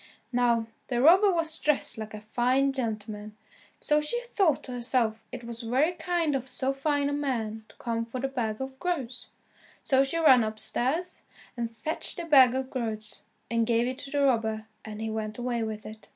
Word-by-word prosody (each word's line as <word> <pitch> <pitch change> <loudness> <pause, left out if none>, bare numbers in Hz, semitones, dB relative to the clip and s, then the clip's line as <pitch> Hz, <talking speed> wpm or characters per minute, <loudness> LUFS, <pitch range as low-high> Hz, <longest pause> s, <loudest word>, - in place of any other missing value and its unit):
Now 240 -2 +3 0.2
the 245 -2 0
robber 370 +9 +7
was 325 -2 0
dressed 300 -2 +1
like 220 0 -6
a 210 - -8
fine 255 +5 +1
gentleman, 215 -4 -4 0.4
so 300 0 +2
she 475 +11 0
thought 390 - +1
to 255 - -8
herself 235 -2 0
it - - -7
was 235 0 -5
very 260 +8 +2
kind 345 -4 0
of 260 -1 -2
so 265 +1 -1
fine 285 +1 0
a 285 - -1
man 225 -7 -2
to - - -18
come 230 -1 -2
for 235 +2 -6
the 270 - 0
bag 230 -5 -2
of 265 0 -6
groats, 275 -9 -2 0.5
so 270 0 +4
she 275 +5 -1
ran 260 -7 +6
upstairs 255 - -1 0.3
and 230 -1 -4
fetched 310 +9 -3
the 345 - -4
bag 265 -6 +7
of 265 0 -3
groats, 215 -4 -4 0.3
and 230 -1 +2
gave 235 0 +3
it 255 +2 -3
to 280 - -7
the 285 0 +1
robber 220 -4 +1 0.2
and 215 0 -7
he 220 0 -2
went 215 -1 -4
away 245 -1 -1
with 220 -1 -4
it. 215 0 -10
250 Hz, 195 wpm, -28 LUFS, 225-280 Hz, 0.5 s, robber